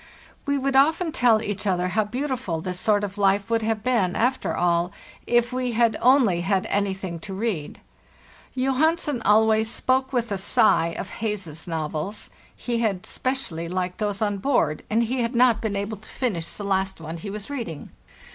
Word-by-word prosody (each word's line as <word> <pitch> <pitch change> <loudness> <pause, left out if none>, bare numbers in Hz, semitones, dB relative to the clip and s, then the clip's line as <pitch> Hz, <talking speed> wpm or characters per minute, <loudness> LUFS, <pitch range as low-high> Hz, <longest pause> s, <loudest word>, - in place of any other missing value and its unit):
We 285 0 +2
would 275 0 -1
often 320 +5 +4
tell 230 -5 +3
each 205 0 -3
other 180 -1 +1
how 215 +3 +1
beautiful 250 - -3
this 180 +2 -4
sort 205 0 +2
of 205 0 -5
life 200 +2 +2
would 230 0 +2
have 220 -1 -1
been, 230 -8 +1
after 255 +3 0
all, 175 0 +1 0.4
if 240 +1 +2
we 250 -1 -1
had 230 0 +3
only 245 -9 +4
had 190 +1 +1
anything 190 -3 -1
to 190 +3 -7
read. 195 -8 -3 0.8
Johansen 270 +1 +1
always 220 +1 +4
spoke 260 +2 +1
with 235 -4 -1
a 200 - -1
sigh 170 -4 +3
of - - -7
Heyse's 190 -8 -3
novels; 160 +4 -4 0.2
he 235 -1 -2
had 205 -5 -1
specially 180 -11 -2
liked 180 +1 -3
those 205 -1 -1
on 205 -2 -1
board, 190 - +1
and 225 +2 +2
he 250 +2 -1
had 235 +1 -1
not 235 -2 +4
been 215 -3 -2
able 200 +2 -3
to 210 - -15
finish 195 -11 -2
the 205 - -7
last 190 -2 -1
one 165 +1 -6
he 185 +5 -7
was 210 +5 -6
reading. 200 - -5
215 Hz, 180 wpm, -24 LUFS, 185-245 Hz, 0.8 s, often